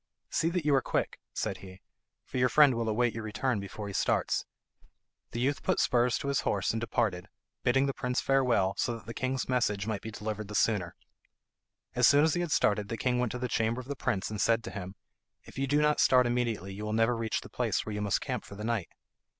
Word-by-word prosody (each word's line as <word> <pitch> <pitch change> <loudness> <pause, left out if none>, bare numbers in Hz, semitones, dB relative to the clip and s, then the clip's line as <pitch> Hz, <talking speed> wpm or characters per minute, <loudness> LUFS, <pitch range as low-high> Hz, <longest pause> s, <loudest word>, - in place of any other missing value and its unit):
"See 165 - +1
that 170 -3 -2
you 150 - +3
are 135 - +4
quick," - - -2
said - - -3
he, 95 -1 -12 0.5
"for 130 - -4
your 125 0 +4
friend 145 +2 +6
will 115 -1 -1
await 120 +2 +1
your 115 - -5
return 110 +2 -1
before 100 +2 -7
he 100 - -6
starts." - - +1 0.8
The 120 - -5
youth 140 +4 0
put - - +1
spurs 120 -1 +3
to 140 - -3
his 140 - +1
horse 100 -2 0
and 115 - -2
departed, 100 -5 -1 0.3
bidding 135 +2 +3
the 135 - -1
prince 125 0 -1
farewell, 125 -8 +2
so 120 - 0
that - - -15
the 115 - -6
king's 130 +1 -2
message 105 -6 0
might 110 -3 -2
be 110 - -6
delivered 110 -1 -5
the 105 - -7
sooner. 100 -7 +1 1.0
As - - +5
soon 145 +1 +6
as 160 -1 +3
he 175 - 0
had 175 -3 -3
started 105 -5 +2
the 115 - -3
king 125 0 0
went 125 -3 0
to - - -3
the 125 0 -2
chamber 115 +1 0
of 130 - -8
the 140 - -3
prince, 105 -6 -2
and 105 - -3
said 115 0 +2
to 95 - -6
him, 95 0 -7 0.5
"If - - -10
you 135 - 0
do 145 +2 +3
not 150 0 +3
start 125 -1 +5
immediately, 120 -5 -1
you 105 +2 -7
will 105 0 -2
never 115 +2 +3
reach 115 -1 -2
the - - -11
place - - -1
where 110 - -4
you 105 - -3
must 100 -1 0
camp - - -3
for 100 - -11
the 105 - -7
night." 110 -6 -1
115 Hz, 240 wpm, -30 LUFS, 105-130 Hz, 1.0 s, friend